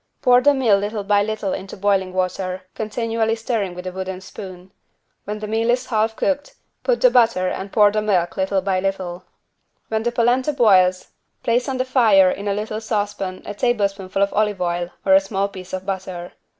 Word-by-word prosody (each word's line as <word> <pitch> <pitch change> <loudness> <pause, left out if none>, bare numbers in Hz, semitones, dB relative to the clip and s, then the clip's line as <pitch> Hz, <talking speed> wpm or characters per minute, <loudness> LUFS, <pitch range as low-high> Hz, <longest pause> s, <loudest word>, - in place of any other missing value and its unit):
Pour 250 0 +5
the 290 +2 +4
meal 230 -7 +3
little 205 +1 -3
by 205 0 +3
little 210 -2 -2
into 190 0 -7
boiling 195 -1 +1
water, 185 0 -2
continually 225 +1 -1
stirring 225 -5 -2
with 180 +1 -8
a 185 - -3
wooden 190 0 -5
spoon. 185 -1 -10 0.5
When 210 +1 -4
the 215 0 -6
meal 225 +2 0
is 250 +1 +1
half 220 -2 0
cooked, 285 +3 -1 0.3
put - - 0
the - - +6
butter 225 -6 +3
and 190 +2 -4
pour 210 -2 +5
the 215 +1 0
milk 185 -5 0
little 190 0 0
by 190 -1 0
little. 185 -2 -3 0.6
While 220 0 0
the 240 +1 -1
=polenta= 245 +4 +1
boils, 185 -8 +3 0.3
place 240 +3 +1
on 265 - -2
the 255 - 0
fire 220 -8 +5
in 200 +2 -5
a 200 - 0
little 215 +1 -4
saucepan 205 -4 -3
a 205 - -5
tablespoonful 200 -4 0
of 200 - -1
olive 210 -2 +1
oil 175 -1 -1 0.2
or 190 - +5
a 190 - +8
small 195 0 -1
piece 185 -2 -11
of 185 0 -5
butter. 185 -2 -5
205 Hz, 195 wpm, -21 LUFS, 190-225 Hz, 0.6 s, a